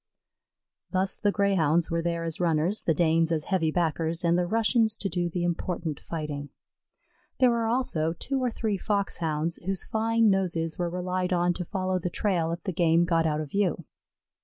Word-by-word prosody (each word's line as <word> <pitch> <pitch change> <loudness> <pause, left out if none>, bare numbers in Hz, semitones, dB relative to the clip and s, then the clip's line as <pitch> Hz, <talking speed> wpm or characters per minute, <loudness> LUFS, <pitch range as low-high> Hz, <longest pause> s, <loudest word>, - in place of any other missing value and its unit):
Thus 190 0 -1
the 205 - +2
Greyhounds 170 -6 +2
were 165 0 +1
there 170 0 -2
as 165 -1 -3
runners, 170 +3 +1
the 165 - +3
Danes 165 0 +2
as 155 -2 0
heavy 180 -4 0
backers, 165 0 -1
and 170 0 +3
the 175 0 +1
Russians 225 +1 +2
to 195 - -1
do 175 0 -1
the 175 +1 -2
important 170 -3 -2
fighting. 150 -3 -5 0.9
There 255 -2 +5
were 230 -1 0
also 195 -10 0
two 265 +9 -2
or 250 - +2
three 220 -3 -2
Foxhounds, 170 -6 -1
whose 190 +1 -3
fine 225 0 +2
noses 170 -4 -1
were 175 -1 0
relied 180 +1 -2
on 175 0 +2
to 180 - -4
follow 185 0 -2
the 180 - -2
trail 175 -3 0
if 170 - -5
the 190 - -3
game 165 0 +3
got 165 -1 +2
out 155 0 0
of 150 - -7
view. 190 -5 0
175 Hz, 185 wpm, -27 LUFS, 165-195 Hz, 0.9 s, There